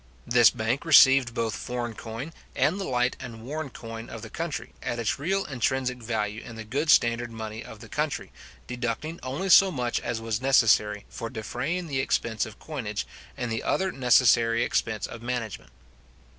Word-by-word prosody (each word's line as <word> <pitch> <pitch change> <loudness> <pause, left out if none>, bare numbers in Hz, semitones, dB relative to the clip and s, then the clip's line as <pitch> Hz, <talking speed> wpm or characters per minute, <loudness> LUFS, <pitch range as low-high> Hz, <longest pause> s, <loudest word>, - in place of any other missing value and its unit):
This 120 -2 +6
bank 110 +6 -1
received 135 -6 +6
both 115 -3 -1
foreign 120 -1 -4
coin, 115 +8 -7 0.2
and 180 +6 +2
the 195 - -3
light 125 0 +1
and 115 -3 -8
worn 150 +3 -4
coin 115 -1 -8
of 115 -1 -8
the 115 - -9
country, 165 -2 -4
at 120 - -3
its 115 +2 -1
real 195 +7 0
intrinsic 130 -1 -1
value 110 -2 -2
in 115 - -10
the 110 - -6
good 140 +9 -2
standard 120 -4 +4
money 110 -1 -6
of - - -11
the - - -10
country, - - -2 0.3
deducting 125 - -4
only 140 +10 -3
so 195 +1 +8
much 125 -8 -1
as 120 -1 -3
was 115 0 -2
necessary 110 -6 +3
for 115 - -6
defraying 130 - -3
the 140 -5 -2
expense 115 -4 0
of 110 - -12
coinage 115 -10 -4 0.3
and 125 -2 -3
the 115 - -1
other 190 0 0
necessary 120 -3 +4
expense 110 -2 -1
of 115 - -9
management. 115 - -4
120 Hz, 175 wpm, -27 LUFS, 115-135 Hz, 0.3 s, so